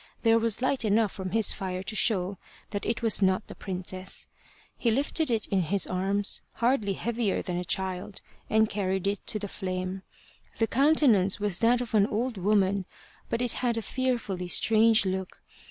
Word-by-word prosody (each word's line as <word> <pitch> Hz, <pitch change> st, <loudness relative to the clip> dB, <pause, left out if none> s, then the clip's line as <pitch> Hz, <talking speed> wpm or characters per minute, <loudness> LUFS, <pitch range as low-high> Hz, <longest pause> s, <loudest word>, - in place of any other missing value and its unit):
There 230 Hz, -1 st, +5 dB
was 230 Hz, +1 st, -1 dB
light 260 Hz, 0 st, +1 dB
enough 215 Hz, -1 st, +2 dB
from 190 Hz, -2 st, -5 dB
his 220 Hz, +1 st, +2 dB
fire 185 Hz, -1 st, -4 dB
to 215 Hz, -, -5 dB
show 195 Hz, -4 st, +1 dB, 0.3 s
that 205 Hz, -2 st, -3 dB
it 230 Hz, +1 st, -1 dB
was 225 Hz, -2 st, +3 dB
not 190 Hz, +2 st, +2 dB
the -, -, -10 dB
princess. 185 Hz, 0 st, -4 dB, 0.5 s
He 240 Hz, -, 0 dB
lifted 280 Hz, +5 st, +1 dB
it 225 Hz, -3 st, +1 dB
in 195 Hz, -2 st, +2 dB
his 195 Hz, +4 st, 0 dB
arms, 195 Hz, +2 st, -1 dB
hardly 230 Hz, -5 st, +1 dB
heavier 230 Hz, 0 st, -1 dB
than 180 Hz, -2 st, -3 dB
a 180 Hz, -, -2 dB
child, 190 Hz, +2 st, -3 dB, 0.3 s
and 220 Hz, 0 st, +4 dB
carried 190 Hz, -2 st, -2 dB
it 200 Hz, 0 st, 0 dB
to -, -, 0 dB
the 205 Hz, -1 st, -5 dB
flame. 185 Hz, -1 st, -4 dB, 0.6 s
The 225 Hz, -, +2 dB
countenance 245 Hz, -8 st, +3 dB
was 205 Hz, -3 st, 0 dB
that 240 Hz, +2 st, +3 dB
of 240 Hz, -2 st, -6 dB
an 205 Hz, -2 st, +4 dB
old 230 Hz, +2 st, -2 dB
woman, 195 Hz, 0 st, +1 dB, 0.4 s
but 230 Hz, +1 st, -1 dB
it 245 Hz, -, -1 dB
had 240 Hz, -2 st, 0 dB
a 225 Hz, -, -2 dB
fearfully 235 Hz, -9 st, -2 dB
strange 220 Hz, +4 st, +4 dB
look. 190 Hz, 0 st, -3 dB
205 Hz, 180 wpm, -27 LUFS, 190-230 Hz, 0.6 s, There